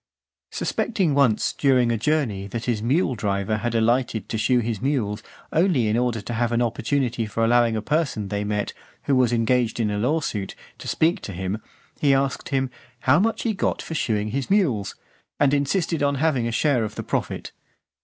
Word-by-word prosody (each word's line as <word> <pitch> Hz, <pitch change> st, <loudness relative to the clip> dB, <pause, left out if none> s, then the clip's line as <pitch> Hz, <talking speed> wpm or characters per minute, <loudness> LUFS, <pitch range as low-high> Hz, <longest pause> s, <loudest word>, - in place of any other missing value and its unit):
Suspecting 190 Hz, -10 st, 0 dB
once, 135 Hz, -6 st, +2 dB
during 130 Hz, -4 st, +3 dB
a -, -, +1 dB
journey, 115 Hz, -6 st, 0 dB
that 115 Hz, +3 st, -5 dB
his 115 Hz, -4 st, 0 dB
mule 135 Hz, +5 st, +1 dB
driver 100 Hz, -1 st, -1 dB
had 120 Hz, +2 st, -2 dB
alighted 115 Hz, -2 st, +1 dB
to 110 Hz, -, -2 dB
shoe 125 Hz, +4 st, +3 dB
his 115 Hz, -3 st, -1 dB
mules, 115 Hz, -7 st, -1 dB, 0.3 s
only 160 Hz, -, +3 dB
in 105 Hz, -, +1 dB
order 120 Hz, -2 st, 0 dB
to 120 Hz, -, -5 dB
have 120 Hz, +1 st, 0 dB
an 120 Hz, -, +1 dB
opportunity 120 Hz, 0 st, -1 dB
for 115 Hz, +2 st, 0 dB
allowing 120 Hz, -1 st, +3 dB
a 110 Hz, -, -2 dB
person 145 Hz, -9 st, 0 dB
they 100 Hz, 0 st, -2 dB
met, 105 Hz, 0 st, -2 dB, 0.3 s
who 140 Hz, -, +2 dB
was 125 Hz, -2 st, +3 dB
engaged 120 Hz, 0 st, +1 dB
in 105 Hz, -2 st, +1 dB
a 105 Hz, -, -1 dB
law 145 Hz, +9 st, +1 dB
suit, 105 Hz, -9 st, -4 dB, 0.2 s
to -, -, -8 dB
speak 170 Hz, +5 st, +1 dB
to 100 Hz, -, -6 dB
him, 95 Hz, +4 st, -3 dB, 0.4 s
he 140 Hz, -2 st, +4 dB
asked 135 Hz, 0 st, -1 dB
him, 135 Hz, -2 st, 0 dB, 0.3 s
"how 135 Hz, +5 st, +4 dB
much 225 Hz, +4 st, 0 dB
he 225 Hz, -, 0 dB
got 190 Hz, -, -1 dB
for -, -, -6 dB
shoeing 110 Hz, -8 st, 0 dB
his 135 Hz, +4 st, -3 dB
mules?" 150 Hz, -, +1 dB, 0.4 s
and 140 Hz, -1 st, +4 dB
insisted 160 Hz, +3 st, 0 dB
on 140 Hz, 0 st, +2 dB
having 135 Hz, -5 st, +1 dB
a -, -, -2 dB
share 130 Hz, -1 st, +2 dB
of 105 Hz, -1 st, -5 dB
the -, -, -4 dB
profit. -, -, -3 dB
120 Hz, 195 wpm, -23 LUFS, 110-140 Hz, 0.4 s, he